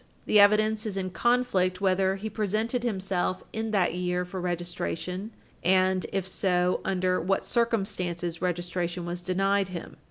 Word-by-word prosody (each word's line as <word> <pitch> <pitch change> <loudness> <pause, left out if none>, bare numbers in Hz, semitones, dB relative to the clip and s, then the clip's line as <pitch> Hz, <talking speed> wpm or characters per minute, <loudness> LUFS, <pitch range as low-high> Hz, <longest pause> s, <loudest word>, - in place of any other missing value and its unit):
The 210 - +5
evidence 215 +1 +4
is 200 -2 -3
in 185 -1 -2
conflict 195 -6 +1
whether 190 0 +2
he 200 +3 -5
presented 220 +3 -1
himself 190 -5 -1
in 220 0 -2
that 195 -6 +2
year 180 0 -1
for 185 0 -6
registration 180 +2 -3 0.3
and, 185 0 +3
if 195 -2 -1
so, 180 -1 +1
under 185 -1 +1
what 195 +3 0
circumstances 180 -7 -1
registration 175 0 -2
was 175 +1 -4
denied 195 +2 +1
him. 180 -4 -8
185 Hz, 145 wpm, -27 LUFS, 180-205 Hz, 0.3 s, The